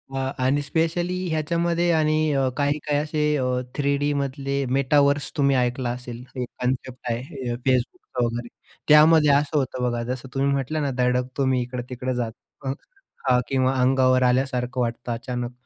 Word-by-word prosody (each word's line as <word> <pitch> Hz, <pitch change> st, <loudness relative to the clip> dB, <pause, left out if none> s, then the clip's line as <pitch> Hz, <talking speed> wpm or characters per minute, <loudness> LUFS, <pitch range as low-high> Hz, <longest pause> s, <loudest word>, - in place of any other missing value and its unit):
अ, -, -, -1 dB, 0.3 s
आणि 135 Hz, +3 st, +2 dB
स्पेशली 165 Hz, +4 st, -1 dB
ह्याच्यामध्ये 170 Hz, +2 st, +1 dB
आणि 155 Hz, 0 st, +2 dB
अ, 135 Hz, -1 st, +2 dB
काही-काही 145 Hz, 0 st, 0 dB
असे 150 Hz, 0 st, -3 dB, 0.2 s
अ, 130 Hz, -, 0 dB, 0.3 s
3D 140 Hz, 0 st, +1 dB
मधले 140 Hz, 0 st, -2 dB
मेटावर्स 140 Hz, +1 st, +2 dB
तुम्ही 140 Hz, -1 st, +3 dB
ऐकला 125 Hz, 0 st, 0 dB
असेल. 125 Hz, 0 st, -7 dB
एक 125 Hz, -1 st, -3 dB
कन्सेप्ट 125 Hz, 0 st, -2 dB
आहे 130 Hz, +2 st, -5 dB
अ, -, -, -1 dB
Facebookचा 125 Hz, -1 st, 0 dB
वगैरे. 120 Hz, +1 st, -3 dB, 0.4 s
त्यामध्ये 150 Hz, 0 st, +7 dB
असं 145 Hz, +2 st, +2 dB
होतं 130 Hz, -2 st, -1 dB
बघा, 120 Hz, 0 st, -2 dB
जसं 130 Hz, +1 st, -6 dB
तुम्ही 135 Hz, +1 st, +1 dB
म्हटलं 140 Hz, +3 st, -1 dB
ना 140 Hz, -2 st, 0 dB
धडकतो 125 Hz, +2 st, 0 dB
मी 130 Hz, -1 st, +2 dB
इकडं-तिकडं 125 Hz, +1 st, -4 dB
जात 120 Hz, -2 st, -2 dB, 0.3 s
हं, 135 Hz, -, 0 dB, 0.5 s
का 125 Hz, -2 st, +4 dB
किंवा 130 Hz, -1 st, +1 dB
अंगावर 130 Hz, 0 st, +4 dB
आल्यासारखं 125 Hz, 0 st, +1 dB
वाटतं 120 Hz, 0 st, -3 dB
अचानक. 120 Hz, +1 st, -4 dB
135 Hz, 155 wpm, -24 LUFS, 125-145 Hz, 0.5 s, त्यामध्ये